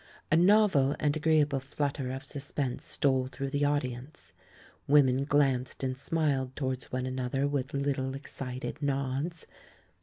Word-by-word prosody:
A - - +6
novel 175 -6 +5
and 150 -1 +1
agreeable 150 -3 +2
flutter 135 0 -3
of 135 +1 -5
sus 140 +1 -7
pense 135 -4 -2
stole 130 -2 +1
through 135 +1 -5
the 145 0 +1
audience; 135 -1 -3 0.5
women 135 -2 +4
glanced 135 -3 +1
and 130 -1 -1
smiled 140 -2 -1
towards 130 -3 -3
one 130 0 -2
another 130 +2 -1
with 140 0 -2
little, 135 -1 -1
ex 140 - -9
cited 130 +3 -5
nods. 140 +4 -2
140 Hz, 145 wpm, -30 LUFS, 130-145 Hz, 0.5 s, A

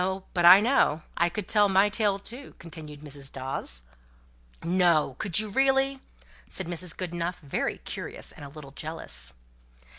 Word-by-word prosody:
But 175 -2 +2
I 185 +3 +10
know. 215 - +2
I 170 +1 +2
could 200 +2 -5
tell 205 -2 +4
my 195 +1 +5
tale 205 -1 +1
too," 240 +7 -8
continued 155 -3 -9
Mrs. 140 -2 -6
Dawes. 130 - -1 0.8
"No! 170 -5 +3
could 195 -6 0
you, 215 0 +2
really?" 270 +3 +2 0.5
said 190 - -2
Mrs. 175 0 -5
Goodenough, 175 -1 -3
very 140 - -2
curious - - -6
and - - -12
a 140 - -8
little 140 -1 -11
jealous. 65 - -6
175 Hz, 150 wpm, -27 LUFS, 150-205 Hz, 0.8 s, I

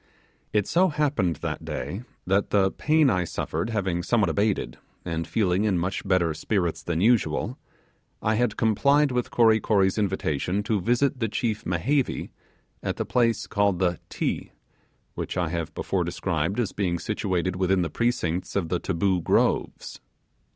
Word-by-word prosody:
It 105 -2 +2
so 185 +2 +3
happened 145 - 0
that - - -3
day 95 - -4 0.2
that 95 +2 +1
the 95 -2 +3
pain 155 -1 +3
I 90 -2 +1
suffered 100 +6 -3
having 95 -6 -1
somewhat 105 -2 +2
abated, 100 +3 -1 0.3
and 85 -2 -3
feeling 95 -3 +1
in 105 -4 +2
much 90 +3 -2
better 90 -4 +2
spirits 85 0 -1
than 85 0 -2
usual, 115 +2 +2 0.6
I 110 - +1
had 110 -1 0
complied 140 +6 +3
with 125 -1 -1
Kory 110 -2 +4
Kory's 100 -2 +2
invitation 95 -1 -1
to 105 -2 0
visit 125 +6 +1
the 115 -3 0
chief 110 -1 -2
Mehevi 120 - 0 0.5
at - - -2
the - - -2
place 115 -3 +1
called 100 -2 +1
the 90 -2 0
'Ti', - - -3 0.6
which - - -4
I 90 -3 0
have 85 -1 -3
before - - -1
described 85 +7 -2
as 110 -6 0
being 90 -4 -1
situated 95 -2 -1
within 95 0 +2
the 85 - -3
precincts 90 -7 -1
of 90 -5 0
the 90 - 0
Taboo 95 0 0
Groves. - - 0
100 Hz, 160 wpm, -25 LUFS, 90-115 Hz, 0.6 s, Kory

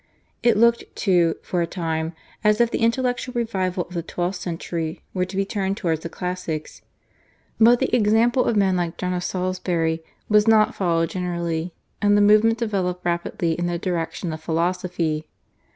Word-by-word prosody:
It 235 -3 +3
looked, 235 +1 +4
too, 175 -4 +2
for 180 - -1
a 170 - 0
time, 165 -2 -3 0.3
as 210 0 +3
if 235 -1 +3
the - - -1
intellectual 245 +2 0
revival 190 -7 -1
of 180 - -14
the 170 - -2
twelfth 180 +2 -3
century 165 -2 -4
were 185 -1 0
to 185 - -9
be 195 0 +1
turned 195 -1 -2
towards 165 -6 0
the 165 - -5
classics; 180 -4 -5 0.8
but 235 +2 +7
the 265 - +1
example 230 +3 +3
of 230 - +1
men 195 -2 +3
like 175 -1 -2
John 180 0 -2
of 180 0 -2
Salisbury 180 -3 -1 0.2
was 210 0 +4
not 220 -1 +5
followed 165 -3 0
generally, 170 -2 -3 0.3
and 205 0 +4
the - - +4
movement 215 +2 +5
developed 190 -6 -2
rapidly 170 -1 -1
in 175 +1 -2
the 175 0 -1
direction 170 -1 -3
of 160 - -7
philosophy. 165 -1 -1
180 Hz, 170 wpm, -23 LUFS, 170-210 Hz, 0.8 s, but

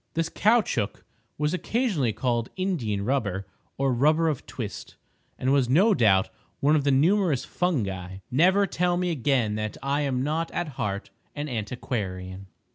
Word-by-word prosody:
This 165 0 0
caoutchouc 205 - +1 0.3
was 150 +2 0
occasionally 185 - 0
called 120 +1 -1
Indian 125 - -1
rubber 105 -7 -1 0.3
or 135 -1 +1
rubber 155 +6 +3
of 150 - -4
twist, - - -7 0.4
and 130 +2 +1
was 135 -4 +2
no 195 - +5
doubt 100 - +3 0.3
one 150 +3 +4
of 145 -2 +1
the 140 - +4
numerous 160 0 +3
fungi. 95 - -2
Never 185 +9 +4
tell 175 -1 0
me 180 0 0
again 130 -7 +1
that 110 0 -4
I 140 +2 0
am 130 -3 0
not 160 +3 -1
at 175 -3 -2
heart 105 -6 -4 0.2
an 145 0 -3
antiquarian. 100 -6 -4
135 Hz, 150 wpm, -26 LUFS, 110-165 Hz, 0.4 s, no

